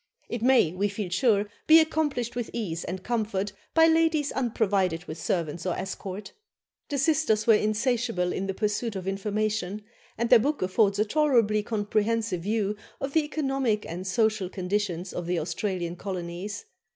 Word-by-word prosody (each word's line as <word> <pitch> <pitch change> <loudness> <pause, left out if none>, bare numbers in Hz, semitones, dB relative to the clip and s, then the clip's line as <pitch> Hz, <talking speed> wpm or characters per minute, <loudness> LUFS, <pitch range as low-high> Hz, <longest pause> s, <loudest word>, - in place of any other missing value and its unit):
It 235 - -3
may, 245 -9 +4
we 200 +3 0
feel 200 -2 -4
sure, 205 +2 +3 0.2
be 320 +1 +9
accomplished 300 -7 0
with 240 -2 -3
ease 175 -8 -3
and 185 +1 -5
comfort 210 -4 -1 0.2
by 325 0 +7
ladies 320 -2 +3
unprovided 200 -9 0
with 160 0 -7
servants 165 0 -2
or 180 -2 -1
escort." 195 +1 -6 0.6
The 285 - -1
sisters 275 -7 +2
were 230 - +6
insatiable 215 -3 +1
in 195 - -2
the 195 - -3
pursuit 210 +1 -1
of 190 -1 -5
information, 210 0 -2 0.3
and 235 +1 -1
their 245 - +9
book 285 0 0
affords 200 +2 +2
a 210 - +2
tolerably 235 -6 +3
comprehensive 215 -2 -1
view 210 +1 0 0.2
of 275 0 -4
the 320 - +4
economic 270 -7 -1
and 180 +3 -5
social 215 -1 +1
conditions 185 -1 -2
of 175 -1 -4
the 180 0 0
Australian 175 +1 -2
colonies. 185 +2 -5
210 Hz, 160 wpm, -27 LUFS, 185-240 Hz, 0.6 s, be